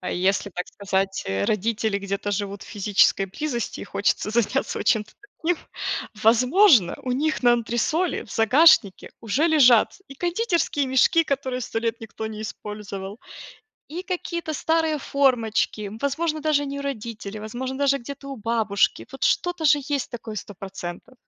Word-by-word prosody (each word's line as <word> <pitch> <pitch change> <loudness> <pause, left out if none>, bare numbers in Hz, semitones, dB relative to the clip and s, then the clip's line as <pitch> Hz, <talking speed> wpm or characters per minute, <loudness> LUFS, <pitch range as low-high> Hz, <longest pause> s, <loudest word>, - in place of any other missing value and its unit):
а, 180 - -4
если, 195 +2 0
так 180 - -3
сказать, 195 -1 -2
э, 95 +1 0
родители 220 0 0
где-то 200 +1 -3
живут 200 0 -3
в - - -13
физической 200 -1 +3
близости 240 +3 -4
и - - -6
хочется 205 +1 0
заняться 235 +4 0
вот - - -5
чем-то 215 -2 +2 0.3
таким, 340 +1 +1 0.7
возможно, 250 - +5
у 255 - -2
них 305 +4 0
на 240 -1 +6
антресоли 240 +9 0
в - - -16
загашнике 245 - +4
уже 255 +9 +1
лежат 255 -8 +5
и - - -8
кондитерские 345 - 0
мешки, 265 +6 +4
которые 260 -2 -1
100 230 -1 -3
лет 230 0 -2
никто 220 0 -6
не 215 -1 -7
использовал, 210 -1 -7 0.7
и 350 +3 -4
какие-то 340 -3 -4
старые 320 0 +1
формочки. 230 -7 +1
Возможно, 310 +3 -1
даже 295 -1 +1
не 280 0 -5
у - - -5
родителей, 220 -6 -5
возможно, 255 +5 -5
даже 280 -1 +3
где-то 275 +2 -9
у 275 - -5
бабушки. 220 -3 0
Вот 270 - -10
что-то 355 -2 +1
же 295 -1 +5
есть 285 -1 -3 0.3
такое 205 +1 -7
процентов. 190 +4 -8
240 Hz, 155 wpm, -24 LUFS, 210-285 Hz, 0.7 s, на